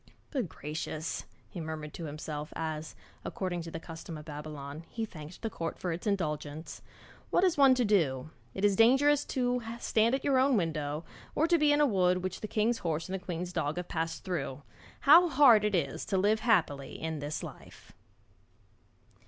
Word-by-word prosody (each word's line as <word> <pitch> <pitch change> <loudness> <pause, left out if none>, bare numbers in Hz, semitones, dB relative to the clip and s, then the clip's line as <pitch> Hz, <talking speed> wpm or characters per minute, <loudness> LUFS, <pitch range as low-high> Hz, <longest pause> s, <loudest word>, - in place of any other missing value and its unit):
'Good 255 - -1
gracious!' 155 +2 -4 0.2
he 175 - -7
murmured 155 -1 -6
to 170 - -6
himself 150 0 -5
as, 155 -1 -4 0.3
according 180 -2 -3
to 165 - -7
the 165 - -6
custom 165 0 -8
of 150 - -10
Babylon, 150 0 -7
he 225 -1 -3
thanked 160 0 -11
the 225 - -1
court 165 -1 -4
for 180 - -3
its 170 +5 -4
indulgence. 155 -5 -3 0.5
'What - - +3
is 365 -3 +4
one 275 -2 +6
to 250 -1 +2
do? 155 -9 +1 0.2
It 195 - +1
is 200 -1 +4
dangerous 270 +6 +5
to 250 -1 0 0.2
stand 230 +3 +2
at 270 - -4
your 270 -2 +3
own 265 -2 +4
window, 155 -3 -2 0.3
or 310 - +3
to 345 - +4
be 295 -1 +4
in 290 - +3
a - - +6
wood 185 -6 +2
which 185 -1 -4
the 215 - -3
king's 225 +3 +1
horse 165 0 -2
and - - -4
the 190 -1 -4
queen's 180 0 -4
dog 145 +1 -1
have 180 0 -4
passed 165 0 -3
through. 145 -6 -3 0.4
How 340 +5 +8
hard 260 -7 +7
it 210 -2 +1
is 140 -6 -1
to 195 - 0
live 210 +3 +3
happily 165 - +1
in 160 -1 -3
this 145 +1 -4
life!' - - -11
175 Hz, 190 wpm, -30 LUFS, 155-225 Hz, 0.5 s, How